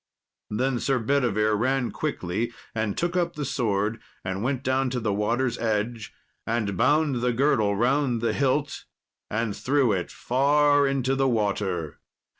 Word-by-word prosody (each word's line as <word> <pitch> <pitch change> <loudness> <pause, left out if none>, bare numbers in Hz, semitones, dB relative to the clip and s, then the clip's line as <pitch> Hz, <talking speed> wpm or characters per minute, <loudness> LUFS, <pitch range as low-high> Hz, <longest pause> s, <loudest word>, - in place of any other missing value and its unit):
Then 125 +3 0
Sir 135 +1 +1
Bedivere 115 -4 +1
ran 130 +3 0
quickly 115 - -2 0.2
and 110 -2 -2
took 175 +1 -1
up 175 -1 0
the 150 -1 -3
sword, 110 -4 -1 0.2
and 95 +1 -3
went 130 +2 -1
down 130 0 +1
to 125 0 -2
the 110 -3 -1
water's 115 +4 0
edge, 110 0 -2 0.4
and 110 -4 -1
bound 150 - +2
the 125 0 +2
girdle 115 -6 +2
round 125 +2 +1
the 115 - 0
hilt 140 +1 0 0.4
and 110 -1 -1
threw 135 -3 +2
it 95 -3 -1
far 145 +8 +3
into 135 -1 0
the 135 0 +2
water. 100 - -1
120 Hz, 150 wpm, -25 LUFS, 105-135 Hz, 0.4 s, far